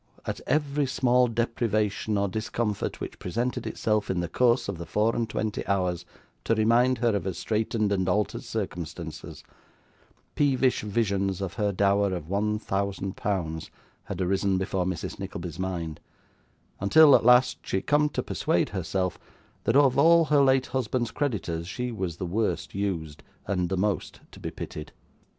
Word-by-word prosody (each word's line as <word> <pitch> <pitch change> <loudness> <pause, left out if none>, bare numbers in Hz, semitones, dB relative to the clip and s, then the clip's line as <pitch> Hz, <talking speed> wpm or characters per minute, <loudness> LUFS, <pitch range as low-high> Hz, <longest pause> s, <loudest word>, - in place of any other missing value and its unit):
At - - -4
every 145 0 +1
small 125 -1 +3
deprivation 110 -3 0
or 100 0 +1
discomfort 110 +1 -2
which - - -7
presented 120 +7 -2
itself 105 -1 0
in 95 - 0
the 85 - -1
course 120 +7 +2
of 100 -4 -4
the 85 - -6
four 110 +2 +1
and 115 -2 -1
twenty 110 -1 -2
hours 90 -3 0 0.4
to 115 - +2
remind 120 +4 +3
her 115 -2 +1
of 100 - -2
her 95 - -1
straitened 110 +1 -1
and 95 -2 +1
altered 105 +3 0
circumstances, 85 -6 -6 0.9
peevish 135 -3 +2
visions 100 -3 0
of 95 -3 -4
her 105 -3 0
dower 100 0 +2
of 80 -3 -6
one 105 +2 0
thousand 100 -2 -2
pounds 80 -6 -2 0.4
had 95 - -5
arisen 95 +1 +1
before 95 -1 -1
Mrs. 90 -3 -4
Nickleby's 85 -1 -6
mind, 85 -4 -3 0.8
until, 145 +9 +7
at - - +3
last, 125 +2 +5
she - - -2
had - - -4
come 150 0 +3
to - - -3
persuade - - 0
herself 90 -2 -2 0.5
that 115 - +2
of 140 -2 +5
all 165 +2 +6
her 150 -2 +4
late 135 -1 +4
husband's 125 -1 -1
creditors 95 - -2
she 125 +6 -3
was 95 -7 -4
the 90 - -3
worst 105 +5 -1
used 85 -7 -3 0.2
and 90 -3 -1
the 95 - -1
most 100 +1 -1
to - - -13
be - - -4
pitied. 75 -1 -8
105 Hz, 165 wpm, -27 LUFS, 95-120 Hz, 0.9 s, until